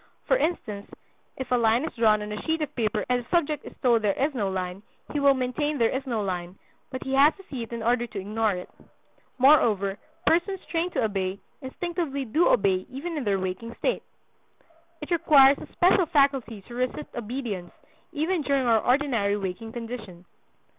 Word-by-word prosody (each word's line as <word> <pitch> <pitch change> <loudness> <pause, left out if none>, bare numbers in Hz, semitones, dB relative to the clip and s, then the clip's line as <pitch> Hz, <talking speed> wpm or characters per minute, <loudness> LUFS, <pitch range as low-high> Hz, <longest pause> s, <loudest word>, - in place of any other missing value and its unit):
For - - +3
instance, 220 - -2 0.5
if 260 -1 -6
a - - +5
line 230 +2 +3
is - - -5
drawn 215 -3 +3
on 210 - -6
a 210 - -4
sheet 320 -1 -1
of 300 - -5
paper 215 -3 -1
and 250 -1 +1
the 235 - -24
subject 310 -4 +1
is - - -11
told 235 -3 +4
there 205 -2 +2
is 280 +3 +1
no 210 -7 -1
line, 185 0 -4 0.3
he 295 - 0
will 280 -1 +5
maintain 285 +4 -1
there 230 0 +2
is 265 +1 -4
no 225 -4 -1
line; 180 -1 -4 0.3
but 260 -1 -6
he 265 - -4
has 285 +3 +5
to 390 - -15
see 260 -4 -4
it 230 - -7
in 230 -1 -4
order 240 +1 +1
to 210 - -6
ignore 215 +2 0
it. 180 0 -6 0.7
Moreover, 220 -8 +4 0.3
persons 375 +3 +2
trained 340 +1 -1
to - - 0
obey, 195 -3 -1 0.2
instinctively 285 0 -3
do 305 +9 +2
obey 190 -4 +2
even 300 +7 -5
in 290 -5 -3
their 200 -1 +2
waking 190 +5 -4
state. - - 0 1.0
It 300 - -8
requires 290 -5 +6
a - - -9
special 360 0 +3
faculty 270 -8 +1
to 240 - -13
resist 255 +4 -3
obedience, 225 -6 -5 0.4
even 325 +4 0
during 275 -2 +1
our 230 -2 +4
ordinary 240 -6 +1
waking 200 +3 -5
condition. 225 -7 -7
245 Hz, 190 wpm, -26 LUFS, 210-290 Hz, 1.0 s, requires